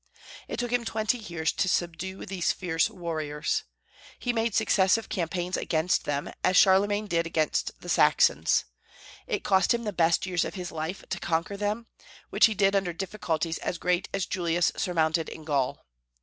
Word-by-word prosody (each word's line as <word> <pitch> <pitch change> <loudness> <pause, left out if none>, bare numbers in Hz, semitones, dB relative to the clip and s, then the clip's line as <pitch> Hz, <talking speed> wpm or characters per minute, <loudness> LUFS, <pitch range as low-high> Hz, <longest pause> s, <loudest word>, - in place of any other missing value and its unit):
It - - -5
took 245 -1 -2
him 245 -1 +1
twenty 220 +2 -1
years 170 -7 -2
to 185 - 0
subdue 175 +2 -2
these 185 -3 0
fierce 175 0 0
warriors. 160 -6 -3 0.5
He 245 - -1
made 225 -2 0
successive 215 0 +3
campaigns 175 0 -2
against 165 +2 0
them, 145 -1 -2
as 185 - +3
Charlemagne 205 +2 +4
did 170 -4 0
against 160 -2 -1
the - - -10
Saxons. 80 +3 +3 0.6
It - - -2
cost 190 +4 +3
him 235 - -4
the 210 -2 -3
best 170 0 +2
years 180 -2 0
of - - -5
his 180 -2 -5
life 160 +4 -4
to - - -3
conquer 170 +4 -1
them, 210 +3 -2 0.5
which - - +6
he 220 - -3
did 195 0 +3
under 190 -3 0
difficulties 165 -3 -2
as 175 - -3
great 180 +1 0
as 195 -2 -1
Julius 175 -1 +1
surmounted 160 -2 0
in 160 - -9
Gaul. 140 -4 -1
180 Hz, 170 wpm, -27 LUFS, 165-200 Hz, 0.6 s, which